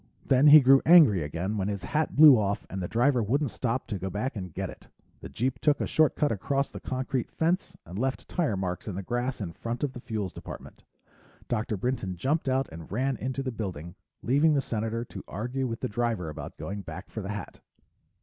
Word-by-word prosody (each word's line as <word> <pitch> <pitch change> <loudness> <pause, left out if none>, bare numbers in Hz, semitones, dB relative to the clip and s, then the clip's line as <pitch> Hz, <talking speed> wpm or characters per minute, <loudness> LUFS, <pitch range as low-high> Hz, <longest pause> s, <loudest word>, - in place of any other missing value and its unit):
Then 135 +3 +5
he 150 +1 +10
grew 135 +1 +6
angry 155 - +7
again 85 +8 -3
when 95 - -1
his 100 -3 -3
hat 150 +11 -1
blew 150 -2 +9
off 100 -2 -1
and 95 - -4
the 90 - -2
driver 125 +4 +2
wouldn't 135 +5 0
stop 125 +1 -2
to 105 -5 -4
go 95 - -3
back 110 +7 -3
and 90 -4 -6
get - - -3
it. - - -12 0.3
The - - -9
jeep 125 +2 -2
took 150 -1 +2
a - - 0
shortcut 150 -1 +2
across 140 +7 -1
the - - -7
concrete 130 -1 -3
fence, 170 +4 -1
and 90 +4 -7
left 130 +2 -2
tire 155 - -1
marks 90 +1 -3
in 100 - -4
the 100 - -4
grass 120 +5 -2
in 85 -4 -5
front 115 - -5
of 140 -3 -1
the 120 - -8
Fuels 110 -6 -4
Department. - - -10 0.6
Dr. 110 -2 -1
Brinton 100 -4 -2
jumped 140 - 0
out 130 +1 +1
and 80 -1 -10
ran 130 +5 0
into 130 +4 -3
the 130 - -2
building, 90 -7 -5 0.3
leaving 145 +5 +3
the - - +3
Senator 115 -1 -3
to 95 - -9
argue 125 +6 -3
with 115 -1 -5
the - - -1
driver 110 -6 -1
about 75 -1 -8
going 100 +1 -5
back 90 +2 -9
for 110 - -5
the 95 - -6
hat. 105 -1 -6
115 Hz, 215 wpm, -28 LUFS, 100-135 Hz, 0.6 s, he